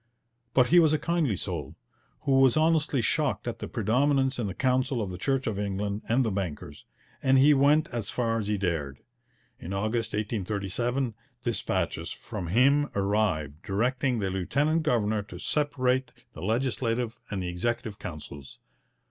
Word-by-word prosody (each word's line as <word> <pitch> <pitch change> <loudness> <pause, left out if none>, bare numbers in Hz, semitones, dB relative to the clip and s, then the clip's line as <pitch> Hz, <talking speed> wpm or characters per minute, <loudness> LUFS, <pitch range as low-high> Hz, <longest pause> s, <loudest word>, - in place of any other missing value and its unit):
But 125 -2 +5
he 175 - +7
was 160 -2 +4
a - - +3
kindly 165 - 0
soul, 80 -6 -4 0.5
who 135 -1 +3
was 135 +1 +5
honestly 155 -5 +2
shocked 150 0 0
at 115 -1 -4
the - - -5
predominance 135 +4 +1
in 110 - -1
the 95 - -5
Council 130 0 +1
of 100 -4 -3
the 90 - -6
Church 135 +4 0
of 105 -3 -2
England 100 +1 -2
and 125 +3 +3
the 110 - 0
bankers, 95 -6 -5 0.3
and 135 0 +4
he 145 +3 +6
went 145 +3 +4
as 115 -3 -4
far 115 -2 0
as 105 - -3
he 105 0 0
dared. 80 -8 -2 0.6
In 90 - -6
August 110 +3 -1
1837 110 +4 -1 0.3
dispatches 120 -2 -1
from 85 - -6
him 140 - +3
arrived, 95 -7 0
directing 125 +5 0
the 95 -3 -1
lieutenant 140 - +1
governor 110 -8 +1
to 100 -3 -10
separate 130 - 0 0.2
the 80 - -9
Legislative 115 +2 -1
and 95 -3 -3
the 90 - -3
Executive 110 +3 -3
Councils. 70 -4 -8
115 Hz, 160 wpm, -27 LUFS, 100-135 Hz, 0.6 s, he